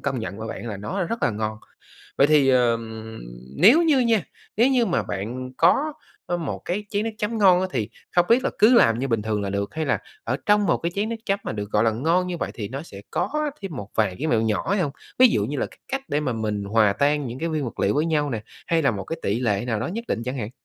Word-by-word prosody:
công 135 -2 -2
nhận 100 -2 -5
với 110 +1 -5
bạn - - -6
là 105 - -4
nó 180 - -3
rất 230 +7 -4
là - - +3
ngon. 110 0 -3 0.6
Vậy 140 - +6
thì, 145 -3 +4
ờm, 115 -3 +1 0.4
nếu 270 - +7
như 310 -5 +4
nha, 230 -5 +3 0.3
nếu 235 +5 +5
như 250 -3 +3
mà 175 - +1
bạn 125 +6 -5
có, 280 - +3 0.3
ơ, 175 - -1
một 165 -5 -4
cái 200 +4 -2
chén 205 0 0
nước 225 - -1
chấm 220 +2 -2
ngon 185 -3 +6
á, 190 - 0
thì 110 -4 -1 0.3
không 175 0 +5
biết 245 +3 +4
là - - +1
cứ 225 +4 +6
làm 115 - +5
như 135 +2 -2
bình 115 -3 0
thường 105 -1 -1
là 100 - -2
được, 100 0 -3
hay 160 0 -1
là 140 - +1 0.3
ở - - -1
trong 205 0 +4
một - - +3
cái 170 +1 -3
chén 205 +2 -1
nước 230 - -3
chấm 195 0 +1
mà - - -3
được 105 -1 -5
gọi 105 +1 +2
là 115 - +4
ngon 165 +10 +1
như 180 -1 -3
vậy - - -3
thì 105 -3 -5
nó 135 +5 -5
sẽ 100 -11 -11
có 300 +10 -1
thêm 190 -7 -5
một 105 -4 -6
vài 105 -5 +1
cái 150 - -2
mẹo 115 -6 +3
nhỏ 110 - -1
hay 200 0 +2
hông? 145 -5 -1 0.3
Ví 255 0 +8
dụ - - +1
như - - -3
là - - 0
cái - - -18
cách 270 0 -2
để 145 - 0
mà 140 -4 -1
mình 105 -3 -2
hòa 105 0 +3
tan 145 +5 +1
những 120 +1 -6
cái 165 - -2
nguyên 155 -3 -1
vật 120 - -6
liệu - - +2
với 150 +3 +1
nhau 150 -3 +1
nè, 110 -4 -3 0.2
hay 165 -1 +2
là 140 - +4
một 100 -4 -5
cái 165 - -5
tỉ 100 +3 0
lệ 105 -4 0
nào 110 -3 -1
đó - - -2
nhất 225 +7 -4
định 115 - -1
chẳng 125 +2 -3
hạn. 110 -2 -4
140 Hz, 285 wpm, -24 LUFS, -, 0.6 s, Ví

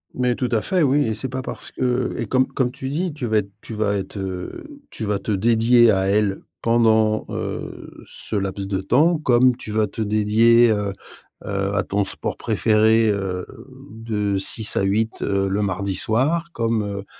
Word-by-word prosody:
Mais 125 -1 0
tout 125 -2 -2
à 110 -2 +1
fait, 185 -2 0
oui 145 0 +3
et 110 - -1
c'est 130 +4 -5
pas 130 0 -5
parce - - -4
que 125 0 -1
et 115 - -2
comme 130 +4 +1
comme 125 -2 -1
tu 130 0 -6
dis 170 +4 -2
tu 140 -5 -4
vas 110 -1 +1
être 100 -1 -1
tu 115 - -9
vas 105 -1 0
être, 100 +1 -5
heu, 95 - -7
tu 110 - -6
vas 105 -1 -1
te 105 - -4
dédier 115 +3 +4
à 95 -1 +1
elle 100 0 +1 0.2
pendant, 110 -2 +2
heu, - - -6
ce 110 - -7
laps 95 0 -3
de 95 -1 -2
temps, 155 - +3
comme 125 -3 +3
tu 110 - -8
vas 110 0 +1
te 105 - -6
dédier, 110 +3 +4
heu, 105 -2 -1 0.5
heu, 100 0 -2
à 100 - +1
ton 100 +2 -1
sport 95 - +4
préféré, 110 +1 +2
heu, 95 -3 -2 0.5
de 105 -3 -2
6 110 +3 -1
à - - +2
8, 110 +3 -1
heu, 100 -1 0
le 100 +2 -1
mardi 95 0 -2
soir 145 - 0
comme, 115 -2 0
heu. 100 -1 -5
110 Hz, 195 wpm, -21 LUFS, 100-120 Hz, 0.5 s, dédier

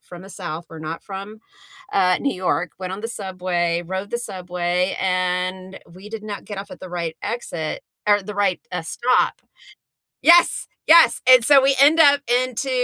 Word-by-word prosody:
from 175 0 -12
the 195 - -12
South, 165 -2 -7
we're 165 - -11
not 160 +1 -6
from, 200 +2 -8 0.5
uh, 180 -2 +3
New 280 - -1
York, 180 -2 -1
went 185 0 -5
on 190 - -6
the 225 - -4
subway, 180 -5 -2
rode 190 +3 -5
the 235 - -2
subway, 180 -3 -2
and 185 0 -2
we 190 +4 -12
did 225 -1 -7
not 205 -1 -7
get 205 -2 -7
off 200 0 -8
at - - -11
the 185 - -9
right 170 -2 -4
exit 175 -9 -4 0.3
er, 205 -1 +4
the 210 +2 -8
right, 200 -3 0
uh, 180 -1 -3
stop 240 +10 0 0.8
Yes. 345 +1 +5 0.2
Yes, 330 0 +6
and 255 -2 +7
so 280 0 +6
we 270 0 +2
end 295 +4 +6
up 285 -2 +6
into 250 +2 0
190 Hz, 180 wpm, -21 LUFS, 180-230 Hz, 0.8 s, and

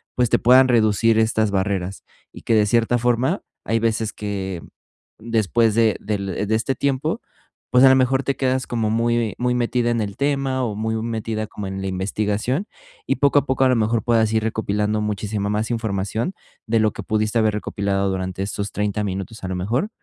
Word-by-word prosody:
pues, 125 -2 +1
te - - +4
puedan 130 +2 +6
reducir 110 -1 +3
estas 110 -1 +1
barreras 95 -1 -2 0.3
y - - -11
que 115 - +1
de 105 -1 +4
cierta 115 +3 +2
forma 125 - 0 0.2
hay 115 - +1
veces 110 -1 -1
que 95 -4 -4 0.6
después 110 0 +1
de 115 -2 +3
del 100 -1 -3
de 110 - +2
este 115 +4 0
tiempo, 140 - -1 0.5
pues, 125 +1 +5
a 135 - +9
lo 130 - +6
mejor 130 +1 +2
te 140 - -1
quedas 130 -1 0
como 115 -3 -1
muy 115 -1 0
muy 125 0 +1
metida 120 0 0
en 115 -1 0
el 100 -2 -4
tema 135 -2 0
o 110 -4 -2
muy 110 +1 -2
metida 110 -1 -3
como 100 -1 -7
en 95 0 -5
la 95 - -3
investigación 105 - -1 0.4
y - - +2
poco 145 0 +4
a 140 - -5
poco 130 -1 +1
a - - +4
lo 125 - +3
mejor 110 +1 +1
puedas 115 -2 +2
ir 110 -1 +1
recopilando 105 -1 -1
muchísima 105 -1 -2
más 105 +3 -1
información 110 - -2 0.3
de 115 0 +2
lo 110 -1 +2
que - - -7
pudiste 110 +1 0
haber 110 -1 +2
recopilado 100 -1 -1
durante 95 0 -3
estos 100 +1 -4
30, 105 0 -1
minutos 100 +3 -5
a - - -3
lo 95 - -2
mejor. 115 - -1
110 Hz, 200 wpm, -21 LUFS, 105-120 Hz, 0.6 s, a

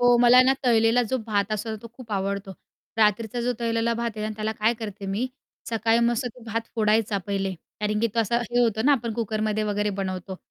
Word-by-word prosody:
हो, 245 0 +6
मला 245 +1 +7
ना 260 +1 +4
तळलेला 230 0 +4
जो 260 - +2
भात 205 -1 0
असतो 220 +1 -3
तो 230 - -9
खूप 240 -3 -10
आवडतो. 195 0 -2 0.4
रात्रीचा 220 +2 +2
जो 245 +1 0
तळलेला 230 0 +1
भात 235 0 -2
आहे 215 - -3
आणि 215 - -4
त्याला 215 0 -2
काय 220 +2 +1
करते 205 -3 -6
मी 200 +6 -1 0.4
सकाळी 225 0 +2
मस्त 240 +1 0
तो 245 0 -8
भात 225 0 -2
फोडायचा 215 -2 +2
पहिले, 195 -1 -1 0.3
कारण 210 0 0
की 230 - +3
तो - - -1
असा 225 +1 +1
हे 240 0 -2
होतो 220 -2 +1
ना 290 - +6
आपण 235 -4 0
कुकरमध्ये 215 -1 -1
वगैरे 210 0 0
बनवतो 185 0 -4
220 Hz, 210 wpm, -25 LUFS, 210-235 Hz, 0.4 s, मला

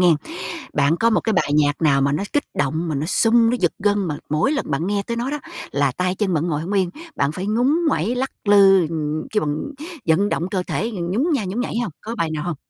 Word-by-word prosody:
nghen. 175 -3 +5 0.6
Bạn 150 +2 +3
có 230 +5 +3
một 220 - +3
cái 220 - -1
bài 185 -7 +1
nhạc 145 +1 +2
nào 140 -3 +4
mà 140 +1 +2
nó 150 - -1
kích 290 - +1
động, 155 +4 -1
mà 155 - -1
nó 145 +3 -2
sung, 230 +4 +4
nó 245 - +1
giật 175 - +2
gân, 205 -1 +1
mà 150 - -2
mỗi 155 - +2
lần 280 - -2
bạn 155 +4 -1
nghe 200 0 0
tới 235 - -3
nó 240 +3 -2
đó 295 - -2 0.3
là 140 -2 +1
tay 180 0 0
chân 190 -3 0
bạn 155 +2 0
ngồi 150 -2 -1
hông 185 - -4
yên, 190 -3 +1 0.3
bạn 140 +1 +1
phải 185 +4 -5
ngúng 245 +9 +2
nguẩy 225 - 0
lắc 260 +2 -1
lư, 195 -3 +6
ừm, 155 -1 -3
kêu 215 - +1
bằng 145 0 -1 0.5
vận 180 +6 +3
động 175 +3 -1
cơ 190 -3 0
thể 225 +4 -2
nhún 190 - -1
nha 265 -8 0
nhún 195 +6 -3
nhảy 245 - -3
hông, 210 -10 -4
có 225 +2 -5
bài 170 -7 0
nào 155 +1 -3
hông? 175 -4 -3
185 Hz, 260 wpm, -21 LUFS, 155-220 Hz, 0.6 s, lư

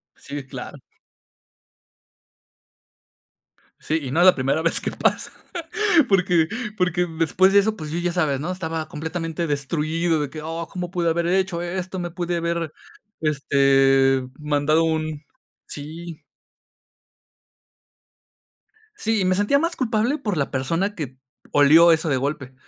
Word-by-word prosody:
Sí, 140 -1 -8
claro. - - -8 3.0
Sí, 160 +1 -1
y 130 -3 -5
no 160 - +1
es 175 - +6
la 185 - +7
primera 135 +4 0
vez 165 - +2
que - - -3
pasa. - - 0 0.8
Porque 180 -4 +3 0.3
porque 180 -2 +1
después 185 +4 +3
de 200 - +6
eso, 215 +2 -1
pues, 155 -5 -7
yo 165 - -2
ya 175 0 -1
sabes, 150 -6 0
¿no? 155 +5 -3
Estaba 165 -3 -4
completamente 165 +2 -4
destruido 155 +3 -1
de 145 - -3
que: 155 +1 -8
"Oh, 165 +1 -4
cómo 180 -2 -5
pude 175 -2 0
haber 170 +1 0
hecho 185 -1 0
esto, 185 +1 -4
me 175 -1 -3
pude 175 0 -3
haber, 170 -2 -2 0.5
este, 135 -2 +3 0.2
mandado 150 +2 +1
un". 155 -2 -2 0.4
Sí. 160 +3 -8 2.7
Sí. 220 - 0
Me 185 0 +2
sentía 205 +8 +2
más 335 +2 -1
culpable 235 +2 0
por 210 - -3
la 140 - -1
persona 165 +10 -1
que 135 -5 -6 0.3
olió 155 +4 +7
eso 160 -1 +1
de 135 - +2
golpe. 135 -1 -3
165 Hz, 140 wpm, -22 LUFS, 150-180 Hz, 3.0 s, la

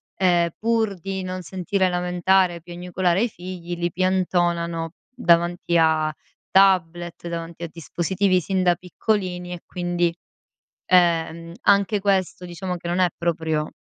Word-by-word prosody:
ehm, 175 -2 +3
pur 225 -2 +1
di 190 +1 -4
non 185 0 -4
sentire 185 +2 -1
lamentare, 180 0 +2
piagnucolare 180 +2 -1
i - - +2
figli, 175 -2 -7
li 175 0 -2
piantonano 175 -2 0 0.2
davanti 175 -6 +2
a 155 -1 +2 0.4
tablet, 175 -3 +2
davanti 170 0 -6
a - - -2
dispositivi 180 +4 0
sin 190 +2 -1
da 175 -1 +4
piccolini 180 0 -2
e 175 - -8
quindi, 175 -1 -1 0.7
ehm, 170 -2 +2
anche 200 +1 +3
questo, 190 -2 0
diciamo 180 +1 -4
che 170 0 -9
non 175 +2 0
è 180 - +4
proprio, 160 -2 -1
175 Hz, 130 wpm, -23 LUFS, 170-185 Hz, 0.7 s, da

